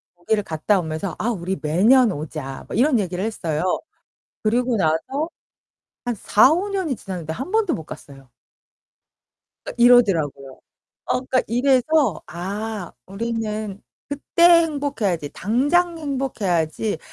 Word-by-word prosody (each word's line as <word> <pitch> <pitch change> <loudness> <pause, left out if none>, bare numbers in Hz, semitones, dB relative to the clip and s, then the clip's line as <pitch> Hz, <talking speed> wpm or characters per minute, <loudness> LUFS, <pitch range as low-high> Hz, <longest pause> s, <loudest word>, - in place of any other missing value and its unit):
거기를 205 +5 -1
갔다 170 +4 +1
오면서 160 +1 -4
"아 220 - -1
우리 190 -2 -3
매년 215 - +4
오자." 145 -3 -6
뭐 - - -6
이런 260 +2 +4
얘기를 185 -2 -3
했어요. 180 -5 -1 0.7
그리고 240 +2 +1
나서 220 - 0 0.8
한 245 -1 -1
4-5 290 - +3
년이 375 -8 -1
지났는데 175 -7 -6
1 265 - -6
번도 430 -4 +1
못 160 - -6
갔어요. 135 -4 -12 1.3
그니까 - - -7
이러더라고요. 170 - +3 0.4
어 - - -1
그러니까 255 0 0
이래서 260 - +2
아 195 +3 -5
'우리는 215 -1 -4 0.3
그때 285 +3 -2 0.2
행복해야지. 275 - -2
당장 300 - +1
행복해야지. 220 - -1
215 Hz, 270 characters per minute, -22 LUFS, 170-260 Hz, 1.3 s, 매년